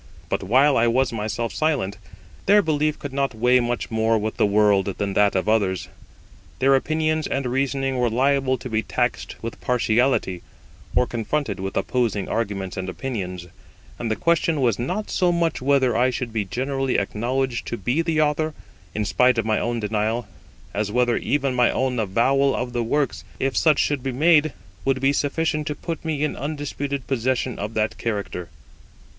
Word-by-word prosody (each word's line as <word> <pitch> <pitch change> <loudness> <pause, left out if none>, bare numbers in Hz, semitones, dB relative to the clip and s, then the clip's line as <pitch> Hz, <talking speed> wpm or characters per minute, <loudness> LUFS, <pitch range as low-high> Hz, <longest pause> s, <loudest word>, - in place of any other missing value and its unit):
But - - -1
while 130 +8 +4
I 115 +1 +4
was 125 +1 +2
myself 110 +1 -3
silent, 130 -11 0 0.5
their 205 +1 +6
belief 155 -1 +1
could 140 -2 -7
not 135 -3 -1
weigh 125 +3 +4
much 120 -1 -2
more 110 0 +2
with 110 0 -3
the - - +3
world 100 -2 +3
than 100 -1 -2
that 100 0 +3
of 95 - 0
others; 100 -4 +1 0.7
their 135 +1 +4
opinions 155 +2 +1
and 135 -1 -2
reasoning 135 +1 0
were 120 -1 +2
liable 130 +2 +2
to 125 - -7
be 110 -2 0
taxed 125 +2 -2
with 115 - -6
partiality, 120 -6 +1 0.5
or 125 - +4
confronted 120 -2 -2
with 95 +1 -4
opposing 115 -6 0
arguments 100 -5 -3
and 95 0 -3
opinions; 90 -6 -4 0.5
and 115 - -2
the 110 - +1
question 165 0 +1
was 120 -6 +1
not 180 - -3
so 180 -2 +2
much 170 -4 0
whether 130 -2 +3
I 125 +2 +3
should 125 -2 -4
be 110 -3 -1
generally 135 +6 -1
acknowledged 120 +4 -1
to 120 - -3
be 120 - 0
the 165 -2 +1
Author, 155 +1 0 0.4
in 105 0 0
spite 125 +3 +3
of 115 - +1
my 110 -1 +1
own 120 0 -1
denial, 110 +2 -1 0.5
as 105 0 -1
whether 120 0 +2
even 140 -2 0
my 125 -1 +4
own 130 -2 0
avowal 130 +7 +2
of 125 0 -3
the 120 -1 0
works, 140 +5 -1 0.2
if 135 0 0
such 155 -3 +4
should 145 -3 +1
be 135 +1 -2
made, 155 +3 +4 0.3
would 135 -1 +1
be 135 +1 +3
sufficient 150 +1 0
to 150 - -2
put 165 +3 -5
me 155 -3 -1
in 150 - -1
undisputed 145 -1 -4
possession 130 -1 -1
of 105 +2 -4
that 110 0 -1
character. 100 -6 -3
125 Hz, 180 wpm, -23 LUFS, 110-140 Hz, 0.7 s, their